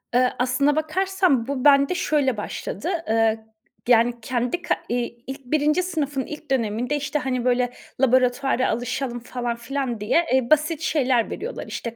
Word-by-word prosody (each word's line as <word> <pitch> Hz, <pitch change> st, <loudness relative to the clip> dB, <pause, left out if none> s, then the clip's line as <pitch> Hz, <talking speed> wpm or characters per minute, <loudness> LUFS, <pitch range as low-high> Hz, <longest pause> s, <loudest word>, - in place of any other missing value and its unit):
Iıı, 250 Hz, 0 st, +4 dB
aslında 260 Hz, +4 st, +2 dB
bakarsan 315 Hz, -4 st, +1 dB
bu 275 Hz, -1 st, -3 dB
bende 280 Hz, +3 st, +5 dB
şöyle 285 Hz, -8 st, +1 dB
başladı. 205 Hz, -, -4 dB, 0.2 s
Eee, 225 Hz, 0 st, +1 dB, 0.4 s
yani, 240 Hz, 0 st, +4 dB
kendi 245 Hz, +7 st, -2 dB
ka -, -, +1 dB
iii, 240 Hz, 0 st, -3 dB
ilk 270 Hz, 0 st, -7 dB
1. 300 Hz, +5 st, +2 dB
sınıfın 290 Hz, -7 st, -2 dB
ilk 300 Hz, -1 st, -9 dB
döneminde, 240 Hz, +2 st, 0 dB
işte, 295 Hz, +1 st, -2 dB
hani, 255 Hz, -2 st, -2 dB
böyle, 250 Hz, 0 st, +2 dB, 0.3 s
laboratuvara 255 Hz, 0 st, +2 dB
alışalım 245 Hz, +1 st, -2 dB
falan 240 Hz, 0 st, -4 dB
filan 245 Hz, 0 st, -3 dB
diye, 230 Hz, +12 st, +2 dB
eee, 260 Hz, -2 st, +2 dB
basit 310 Hz, +1 st, +2 dB
şeyler 260 Hz, -7 st, +1 dB
veriyorlar, 475 Hz, +5 st, -6 dB
işte, 235 Hz, -1 st, -5 dB
260 Hz, 150 wpm, -23 LUFS, 240-295 Hz, 0.4 s, bende